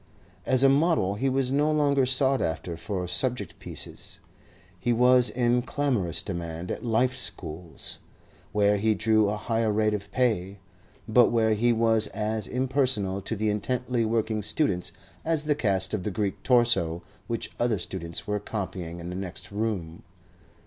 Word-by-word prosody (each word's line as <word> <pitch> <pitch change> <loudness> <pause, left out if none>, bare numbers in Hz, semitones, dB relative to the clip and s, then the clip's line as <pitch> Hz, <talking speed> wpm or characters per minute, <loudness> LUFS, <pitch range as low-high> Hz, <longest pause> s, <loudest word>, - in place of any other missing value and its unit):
As 130 0 +3
a - - +8
model 140 - +3
he 130 +7 0
was 130 -1 0
no 145 +3 +2
longer 140 -3 +2
sought 130 +1 +2
after 85 +1 -2
for 90 +2 -4
subject 100 -1 -1
pieces. - - -6 0.6
He 120 - 0
was 125 +1 +5
in 120 0 +1
clamorous 120 - -1
demand 85 -2 -5
at - - -5
Life 120 +2 +1
Schools, 85 -6 -4 0.5
where 105 0 +3
he 110 +1 +2
drew 110 -1 +3
a 105 - -2
higher 115 0 0
rate 105 0 +2
of 100 -1 -5
pay, 105 -6 0 0.5
but 120 +1 +5
where 110 -2 +2
he 120 +3 +2
was 115 -1 +3
as 110 -1 -2
impersonal 125 -7 0
to 110 - -4
the 105 0 0
intently 125 +3 -1
working 110 -1 0
students 100 - 0 0.3
as 160 -2 +3
the 150 - +3
cast 95 -8 0
of 105 - -1
the 105 - -2
Greek 100 -1 -2
torso 115 -10 +2 0.2
which 115 -1 -3
other 120 -3 +1
students 85 -2 -4
were 105 0 -1
copying 95 -5 -5
in 85 +1 -6
the - - -5
next 95 0 -5
room. 100 -6 -3
110 Hz, 160 wpm, -26 LUFS, 95-125 Hz, 0.6 s, a